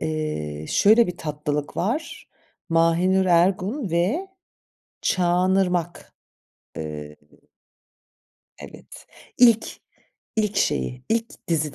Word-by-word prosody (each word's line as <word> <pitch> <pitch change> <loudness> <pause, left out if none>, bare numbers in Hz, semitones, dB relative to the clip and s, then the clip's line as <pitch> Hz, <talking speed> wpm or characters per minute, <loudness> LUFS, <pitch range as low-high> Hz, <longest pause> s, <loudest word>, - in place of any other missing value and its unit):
Eee, 150 - -3
şöyle 220 +3 +5
bir 180 - -5
tatlılık 150 -1 -4
var. 250 - -3 0.4
Mahinur 170 +3 +3
Ergun 185 - +1
ve 205 - 0 0.7
Çağan 180 +1 +2
Irmak. 175 -1 -3 0.6
Eee 75 -1 -7 1.4
Evet. - - -13 0.3
İlk 230 -3 +5 0.7
ilk 210 -2 0
şeyi 125 - -1
ilk 225 -3 -3
dizi 155 -3 -1
175 Hz, 85 wpm, -23 LUFS, 150-200 Hz, 1.4 s, şöyle